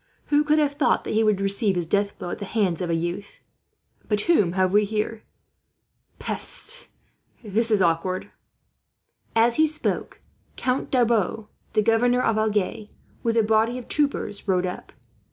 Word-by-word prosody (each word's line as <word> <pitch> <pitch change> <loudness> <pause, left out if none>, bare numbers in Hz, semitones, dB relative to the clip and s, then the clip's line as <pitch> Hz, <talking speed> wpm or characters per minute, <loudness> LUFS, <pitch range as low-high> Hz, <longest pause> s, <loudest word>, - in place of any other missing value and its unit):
Who 295 +1 +5
could 300 +1 +2
have 295 -2 +2
thought 285 0 +1
that - - -4
he 220 +1 +3
would 215 -3 +2
receive 195 0 +2
his 175 -1 -1
death 200 +4 0
blow 175 - -6
at - - -5
the 200 - -5
hands 195 -5 0
of 175 - -2
a 165 - +1
youth? 175 +4 -5 0.7
"But 210 -1 +1
whom 205 - +2
have 185 0 +1
we 210 +1 +5
here? 215 +1 -2 1.0
Peste! - - -2 0.6
This 225 +2 0
is 210 -4 +3
awkward." 175 +2 -1 1.0
As 230 +1 +3
he 315 0 +5
spoke, 300 0 -3 0.4
Count 255 +1 -1
Darbois, 225 -4 +1 0.3
the 215 - +2
governor 245 +3 +3
of 220 -3 +1
Agen, 215 0 -1 0.3
with 230 0 0
a 225 - +4
body 220 +3 +2
of 250 - -9
troopers, 280 -9 -1
rode 185 -1 +2
up. 180 - -6
215 Hz, 165 wpm, -24 LUFS, 195-235 Hz, 1.0 s, Who